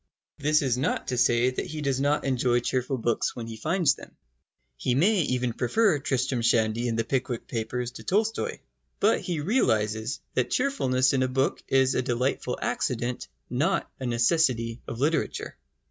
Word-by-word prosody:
This 150 Hz, +1 st, +3 dB
is 125 Hz, -2 st, +1 dB
not 135 Hz, -, -1 dB
to 125 Hz, -, -1 dB
say 120 Hz, +1 st, +3 dB
that 130 Hz, -, -3 dB
he 155 Hz, -, -6 dB
does 135 Hz, -3 st, 0 dB
not 145 Hz, +1 st, +1 dB
enjoy 125 Hz, -2 st, +2 dB
cheerful 130 Hz, +2 st, -1 dB
books 120 Hz, -1 st, 0 dB
when 120 Hz, -, -5 dB
he 115 Hz, 0 st, -7 dB
finds 165 Hz, -, +2 dB
them. -, -, -13 dB, 0.6 s
He 120 Hz, -, -1 dB
may 190 Hz, +7 st, +3 dB
even 125 Hz, -4 st, 0 dB
prefer 160 Hz, -, +2 dB
Tristram 130 Hz, -2 st, -1 dB
Shandy 115 Hz, 0 st, +2 dB
and 115 Hz, -1 st, -1 dB
The 115 Hz, -, +1 dB
Pickwick 125 Hz, -1 st, -2 dB
Papers 120 Hz, +1 st, -3 dB
to -, -, -10 dB
Tolstoi. 220 Hz, +3 st, -1 dB, 0.4 s
But 215 Hz, +3 st, +3 dB
he 170 Hz, -4 st, -3 dB
realises 110 Hz, -, +1 dB
that -, -, 0 dB
cheerfulness 135 Hz, -, +1 dB
in 135 Hz, -, +2 dB
a 130 Hz, -, +2 dB
book 130 Hz, +1 st, 0 dB
is 130 Hz, -1 st, +3 dB
a -, -, +1 dB
delightful 125 Hz, 0 st, -1 dB
accident, 125 Hz, 0 st, -2 dB, 0.2 s
not -, -, 0 dB
a 130 Hz, -, -3 dB
necessity 120 Hz, -2 st, +1 dB
of 115 Hz, -, -6 dB
literature. 155 Hz, +4 st, -1 dB
130 Hz, 170 wpm, -26 LUFS, 120-145 Hz, 0.6 s, This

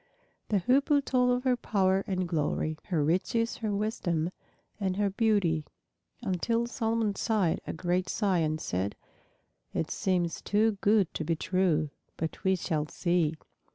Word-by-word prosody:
The 210 Hz, -, +3 dB
Hoopoe 280 Hz, -, +3 dB
told 250 Hz, -1 st, +3 dB
of 250 Hz, 0 st, 0 dB
her 255 Hz, -2 st, +3 dB
power 195 Hz, -4 st, +1 dB
and 185 Hz, -2 st, -1 dB
glory, 155 Hz, -1 st, 0 dB
her 170 Hz, -7 st, 0 dB
riches, 190 Hz, +9 st, +1 dB
her 220 Hz, -2 st, -2 dB
wisdom, 180 Hz, -5 st, -1 dB, 0.5 s
and 190 Hz, -2 st, -1 dB
her 205 Hz, -1 st, +1 dB
beauty, 200 Hz, -7 st, +2 dB, 0.6 s
until 230 Hz, +4 st, 0 dB
Solomon 225 Hz, -3 st, 0 dB
sighed 200 Hz, -4 st, +1 dB
a -, -, -3 dB
great 180 Hz, +2 st, -1 dB
sigh 195 Hz, -5 st, +1 dB
and 155 Hz, -1 st, 0 dB
said, 95 Hz, -3 st, -2 dB, 0.8 s
"It 160 Hz, -, -1 dB
seems 180 Hz, -5 st, 0 dB
too 210 Hz, 0 st, +2 dB
good 205 Hz, -4 st, +3 dB
to -, -, -3 dB
be 165 Hz, +2 st, 0 dB
true! 160 Hz, -3 st, +1 dB, 0.3 s
But 160 Hz, 0 st, -4 dB
we 190 Hz, 0 st, +3 dB
shall 160 Hz, -4 st, -1 dB
see." 170 Hz, -2 st, +1 dB
190 Hz, 150 wpm, -29 LUFS, 165-220 Hz, 0.8 s, The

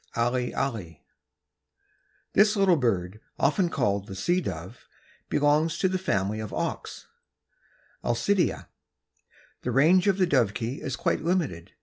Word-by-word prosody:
(Alle 120 Hz, +1 st, 0 dB
alle.) 110 Hz, -12 st, -3 dB, 1.4 s
This 210 Hz, +1 st, +5 dB
little 195 Hz, -3 st, +4 dB
bird, 105 Hz, -, -1 dB, 0.2 s
often 170 Hz, +6 st, +2 dB
called 100 Hz, -8 st, -1 dB
the 95 Hz, -, -7 dB
Sea 175 Hz, -, +1 dB
Dove, 90 Hz, -, -7 dB, 0.4 s
belongs 150 Hz, +2 st, +2 dB
to 190 Hz, -, +2 dB
the 185 Hz, 0 st, -1 dB
family 105 Hz, -, -1 dB
of 110 Hz, -2 st, -5 dB
auks -, -, -4 dB, 1.0 s
(Alcidæ). 175 Hz, +11 st, +1 dB, 1.0 s
The 125 Hz, -, -2 dB
range 165 Hz, -, +4 dB
of 195 Hz, -2 st, +3 dB
the 190 Hz, -, +3 dB
Dovekie 120 Hz, -, 0 dB
is 130 Hz, -3 st, -3 dB
quite -, -, 0 dB
limited. 160 Hz, -, -1 dB
130 Hz, 125 wpm, -26 LUFS, 105-175 Hz, 1.4 s, This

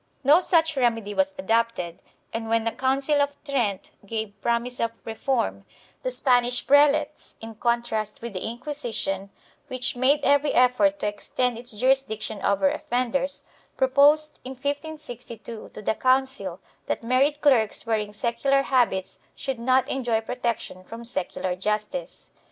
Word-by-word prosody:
1 280 Hz, +2 st, +6 dB
No -, -, +6 dB
such 325 Hz, -3 st, +2 dB
remedy 225 Hz, -5 st, +1 dB
was 285 Hz, +4 st, +1 dB
adopted, 230 Hz, -9 st, 0 dB, 0.3 s
and 225 Hz, 0 st, -3 dB
when 225 Hz, 0 st, +2 dB
the 230 Hz, -, 0 dB
Council 275 Hz, +4 st, +1 dB
of 285 Hz, 0 st, 0 dB
Trent 235 Hz, -9 st, -1 dB
gave 220 Hz, 0 st, -4 dB
promise 235 Hz, +1 st, -1 dB
of 230 Hz, -, +1 dB, 0.2 s
reform, 220 Hz, -, -1 dB, 0.4 s
the -, -, -1 dB
Spanish 245 Hz, -, +2 dB
prelates, 295 Hz, +1 st, +3 dB
in 225 Hz, 0 st, -8 dB
contrast 225 Hz, -2 st, -1 dB
with 235 Hz, -2 st, -6 dB
the 185 Hz, -, -3 dB
Inquisition, 225 Hz, -6 st, -3 dB, 0.4 s
which 255 Hz, -2 st, -2 dB
made 270 Hz, +4 st, +3 dB
every 285 Hz, +1 st, +3 dB
effort 255 Hz, +4 st, +4 dB
to 250 Hz, -, -2 dB
extend 240 Hz, +4 st, -1 dB
its 240 Hz, +1 st, -7 dB
jurisdiction 220 Hz, -3 st, 0 dB
over 200 Hz, +7 st, +2 dB
offenders, 270 Hz, 0 st, -1 dB, 0.3 s
proposed 285 Hz, +3 st, +4 dB
in 260 Hz, -, -6 dB
1562 260 Hz, -5 st, -6 dB
to -, -, -9 dB
the -, -, +1 dB
council 255 Hz, -7 st, 0 dB, 0.3 s
that -, -, -2 dB
married 270 Hz, +5 st, +2 dB
clerks 245 Hz, -9 st, +3 dB
wearing 215 Hz, -2 st, -1 dB
secular 270 Hz, +5 st, +1 dB
habits 240 Hz, -9 st, +1 dB, 0.2 s
should 265 Hz, -3 st, -4 dB
not 255 Hz, +2 st, +3 dB
enjoy 240 Hz, -4 st, 0 dB
protection 230 Hz, -5 st, -3 dB
from 230 Hz, +5 st, -9 dB
secular 185 Hz, -4 st, -3 dB
justice. 210 Hz, -, -3 dB
245 Hz, 140 wpm, -25 LUFS, 220-275 Hz, 0.4 s, 1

